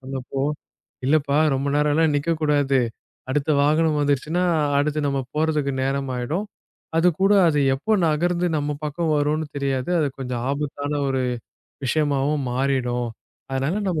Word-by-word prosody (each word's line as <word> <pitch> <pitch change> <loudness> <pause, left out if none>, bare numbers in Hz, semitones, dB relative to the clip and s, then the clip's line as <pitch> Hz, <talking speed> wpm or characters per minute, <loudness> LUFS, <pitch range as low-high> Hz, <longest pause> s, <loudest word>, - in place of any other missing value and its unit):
சொன்னபொழுது, 135 +2 -3 0.5
"இல்லைப்பா 145 -1 +2 0.2
ரொம்ப 135 +2 -2
நேரம் 150 0 +2
எல்லாம் 160 -1 +3
நிற்கக் 160 +2 -1
கூடாது. 145 -3 +3 0.5
அடுத்த 150 +2 0
வாகனம் 155 +1 +2
வந்துருச்சுன்னா 145 +5 +1 0.3
அடுத்து 150 +1 0
நம்ம 140 -1 0 0.2
போறதுக்கு 150 -3 +1
நேரமாகிடும், 135 - -2 0.5
அது 180 +2 +5
கூட 195 - +5 0.2
அது 150 -2 +1 0.2
எப்போ 215 +11 -2 0.2
நகர்ந்து 175 +3 +1
நம்ம 145 0 -2
பக்கம் 155 +1 -1
வரும்னு 150 +2 0
தெரியாது, 135 +2 -1
அது 145 - +1
கொஞ்சம் 125 -2 -3
ஆபத்தான 145 0 -3 0.2
ஒரு 130 -1 0 0.6
விஷயமாவும் 145 -1 +1
மாறிடும். 125 -2 0 0.4
அதனால 135 +10 -1
நம்ம 170 -4 0
145 Hz, 135 wpm, -23 LUFS, 135-155 Hz, 0.6 s, அது